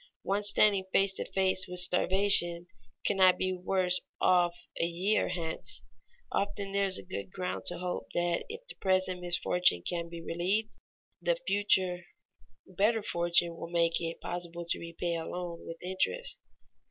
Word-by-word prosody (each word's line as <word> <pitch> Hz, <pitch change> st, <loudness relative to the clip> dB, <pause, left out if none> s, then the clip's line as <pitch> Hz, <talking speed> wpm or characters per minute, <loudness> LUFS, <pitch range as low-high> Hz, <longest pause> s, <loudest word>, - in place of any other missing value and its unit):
One 200 Hz, +1 st, 0 dB
standing 200 Hz, -1 st, +4 dB
face 195 Hz, 0 st, +3 dB
to -, -, -6 dB
face 185 Hz, -1 st, +2 dB
with 180 Hz, 0 st, -6 dB
starvation 180 Hz, -1 st, +3 dB, 0.4 s
cannot 185 Hz, -1 st, +5 dB
be 185 Hz, 0 st, 0 dB
worse 185 Hz, 0 st, +3 dB, 0.2 s
off 175 Hz, -1 st, +3 dB, 0.2 s
a -, -, +2 dB
year 185 Hz, +5 st, +1 dB
hence; 165 Hz, -2 st, -3 dB, 0.5 s
often 200 Hz, 0 st, -2 dB
there 200 Hz, 0 st, +1 dB
is 190 Hz, -, 0 dB
good 185 Hz, -, -5 dB
ground 180 Hz, -1 st, -4 dB
to -, -, -2 dB
hope 180 Hz, 0 st, -4 dB
that 175 Hz, -1 st, 0 dB
if 465 Hz, +3 st, -8 dB
the -, -, -7 dB
present 185 Hz, -1 st, +1 dB
misfortune 175 Hz, -, +2 dB
can 170 Hz, -1 st, -2 dB
be 170 Hz, 0 st, -7 dB
relieved, 190 Hz, +7 st, -1 dB, 0.5 s
the -, -, +2 dB
future 185 Hz, -3 st, +1 dB, 0.6 s
better 205 Hz, +4 st, +1 dB
fortune 170 Hz, -2 st, +1 dB
will 165 Hz, 0 st, -7 dB
make 170 Hz, -1 st, +1 dB
it 165 Hz, 0 st, -4 dB
possible 175 Hz, -1 st, -4 dB
to -, -, 0 dB
repay 170 Hz, +1 st, -4 dB
a 165 Hz, -, -4 dB
loan 175 Hz, -2 st, -6 dB
with 165 Hz, -, -6 dB
interest. 190 Hz, -, -1 dB
180 Hz, 155 wpm, -30 LUFS, 170-195 Hz, 0.6 s, cannot